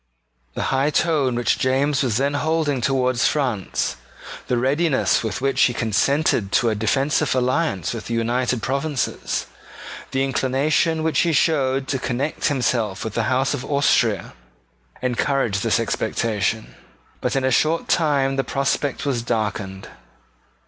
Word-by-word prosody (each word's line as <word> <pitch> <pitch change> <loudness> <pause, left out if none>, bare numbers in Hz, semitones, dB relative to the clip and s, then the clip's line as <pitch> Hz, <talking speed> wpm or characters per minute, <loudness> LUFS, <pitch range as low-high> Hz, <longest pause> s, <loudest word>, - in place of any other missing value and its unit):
The - - -1
high 135 +2 +2
tone 150 -5 +1
which 120 0 +1
James 135 +2 +1
was 120 -5 0
then 140 +2 0
holding 145 -2 0
towards 130 -1 +1
France, 125 - -1 0.5
the 125 - +1
readiness 140 +3 +1
with 105 -3 -3
which 135 0 +1
he 120 - +3
consented 115 -1 +1
to 120 - +3
a - - +1
defensive 135 +5 +1
alliance 130 - 0
with 115 - -6
the 115 - -2
United 120 +1 0
Provinces, 140 +1 -2 0.6
the 135 0 0
inclination 140 +5 +1
which 160 -1 +1
he 170 - +2
showed 135 -3 +1
to 135 - 0
connect 130 +4 -2
himself 120 -7 0
with 110 - -4
the 115 0 0
House 130 +2 +1
of 135 -3 -4
Austria, 140 -1 +1 0.7
encouraged 125 -4 0
this - - +2
expectation. 110 0 -1 0.5
But - - -1
in 135 - +1
a 130 - +1
short 160 +4 +1
time 140 -5 +1
the 135 - +1
prospect 140 +2 -1
was 130 -5 0
darkened. 105 -4 -3
130 Hz, 140 wpm, -22 LUFS, 120-145 Hz, 0.7 s, he